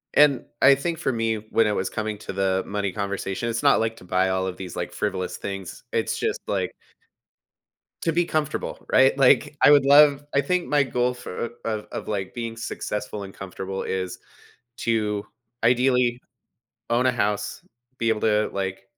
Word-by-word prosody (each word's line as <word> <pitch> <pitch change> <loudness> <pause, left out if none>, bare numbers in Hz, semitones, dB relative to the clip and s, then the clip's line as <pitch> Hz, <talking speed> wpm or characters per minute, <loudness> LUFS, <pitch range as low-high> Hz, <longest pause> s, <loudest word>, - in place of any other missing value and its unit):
And 145 -4 +5 0.2
I 140 +1 +8
think 165 +4 -3
for 145 -5 0
me, 115 -1 0
when 110 +1 +1
I 105 - +1
was 95 - -1
coming 110 -2 -3
to - - -7
the 95 -1 +1
money 100 -1 -2
conversation, 100 +2 -3
it's 115 0 -2
not - - +5
like 115 0 -1
to - - -14
buy 95 +1 +1
all 95 0 0
of 90 - -5
these, 90 -2 -7
like, 90 0 -4
frivolous 95 0 -3
things. 95 -2 -6
It's - - -1
just, - - -1
like 95 -3 -1 1.3
to 165 - +1
be 175 +1 +3
comfortable, 155 -2 -2
right? 130 +1 +5
Like, 135 +2 +4
I 145 - +8
would 140 -2 +6
love 145 0 +6
I 140 - +4
think 180 +5 0
my 145 -1 +4
goal 125 -1 0
for 120 -2 -5 0.2
of 110 -1 -2
of, - - -6
like, 95 -2 -3
being 115 -1 -4
successful 105 -2 -4
and 95 - -9
comfortable 95 0 -5
is 95 -1 -3 0.6
to 105 -3 0 0.4
ideally 125 0 +3 0.7
own 125 +2 +3
a 125 - +4
house, 105 -3 -1 0.3
be 115 -1 +1
able 110 - 0
to, 105 -1 +2
like, 95 0 -3
110 Hz, 180 wpm, -24 LUFS, 95-125 Hz, 1.3 s, I